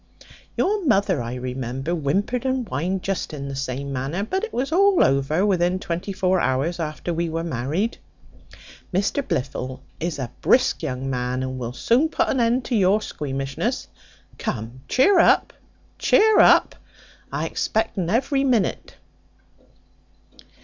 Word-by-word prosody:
Your 410 0 +1
mother, 200 - +2
I 120 +1 -4
remember, 130 +3 -4
whimpered 190 - -1
and 260 -3 -1
whined 180 +6 -2
just 190 -5 -3
in 140 -1 -6
the 135 - -5
same 135 +1 -4
manner; 135 +9 -2
but 380 - -2
it 455 - -3
was 265 +4 -2
all 390 +2 +5
over 140 +7 +2
within 180 -2 +2
twenty 180 +2 -4
four 185 -1 +1
hours 140 +7 0
after 160 +2 -3
we 170 0 -1
were 165 +1 -2
married: 160 - -2 0.9
Mr 200 +9 0
Blifil 130 - -3 0.2
is 170 -1 -2
a 130 -4 -4
brisk 255 +1 +3
young 135 -4 -3
man, 125 0 -2
and 130 0 -4
will 120 -1 -4
soon 250 - +2
put - - 0
an 265 - +1
end 240 +2 +2
to 245 - -1
your 200 0 +4
squeamishness. 135 -8 -3 0.5
Come, 115 +4 -4
chear 365 +8 +4
up, - - +4 0.5
chear 435 0 +5
up; - - +6 0.6
I - - -2
expect 220 +1 -1
un 175 -3 -2
every 270 +6 +1
minute." 245 -7 0
175 Hz, 150 wpm, -23 LUFS, -, 0.9 s, up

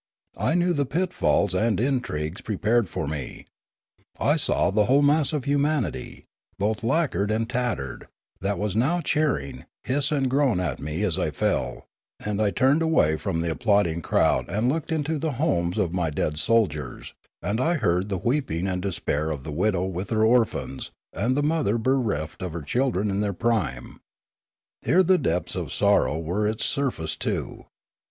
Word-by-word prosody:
I 160 - +1
knew 175 0 +2
the 145 -3 +1
pitfalls 180 - +1
and 105 +2 +1
intrigues 105 - -1
pre 105 -3 -4
pared 110 -1 +2
for 80 - -3
me; 70 -4 -6 0.7
I - - +3
saw - - +3
the 105 +1 +3
whole 140 +5 +4
mass 145 +1 +4
of 150 -4 -2
humanity, 145 -4 -1 0.3
both 105 +2 -1
lacquered 115 - +1
and 110 +1 0
tattered, 115 - -3 0.3
that 100 0 -1
was 105 0 -2
now 150 +10 +2
cheering, 150 - -1 0.2
hiss 140 +2 0
and 140 -3 +1
groan 130 -6 +2
at 80 -8 -2
me 75 +6 -3
as 95 -3 +1
I 85 - 0
fell; 75 - -1 0.3
and 105 0 -2
I 105 - +3
turned 135 - +2
away 160 - +3
from 80 0 -2
the 85 0 -1
ap - - -5
plauding 100 -7 +2
crowd - - +1
and 105 +7 +1
looked 160 +4 -2
into 155 0 -1
the 155 0 -1
homes 105 - 0
of 90 -5 0
my 90 -3 0
dead 75 0 -2
soldiers, 80 - 0 0.3
and 110 +4 -1
I 170 +6 +2
heard 95 - 0
the 95 - -1
weeping 120 - -1
and 90 -1 -1
despair 80 -5 -1
of 70 -4 -4
the 75 - -6
widow 90 +3 +1
with 95 +1 -4
her 110 -1 +2
orphans 115 - +1 0.2
and 115 - 0
the 145 - +1
mother 150 -8 +1
bereft 110 - -1
of 90 -3 -4
her 85 -2 -5
children 105 - 0
in 95 - -1
their 100 -1 -1
prime. 95 - -2 0.8
Here 175 +11 +4
the 185 +1 +4
depths 85 +2 -1
of - - -4
sorrow 75 - +2
were 90 +6 -1
its 110 0 -1
surface 120 - -1
too. - - -4
105 Hz, 175 wpm, -25 LUFS, 85-135 Hz, 0.8 s, whole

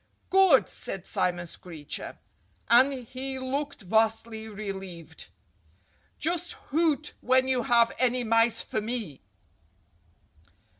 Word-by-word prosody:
"Good!" 380 -8 +6
said 195 -3 -5
Simon 175 -1 -1
Screecher. 160 -3 -7 0.5
And 255 +4 +7
he 265 +3 -5
looked 275 +1 -3
vastly 220 +2 0
relieved. 195 -6 -7 0.9
"Just 345 +2 -1
hoot 305 0 0
when 260 +1 +3
you 260 -2 +2
have 235 -2 +4
any 250 0 +2
mice 230 0 +2
for 215 - -3
me!" 215 - -5
235 Hz, 100 wpm, -27 LUFS, 200-265 Hz, 0.9 s, And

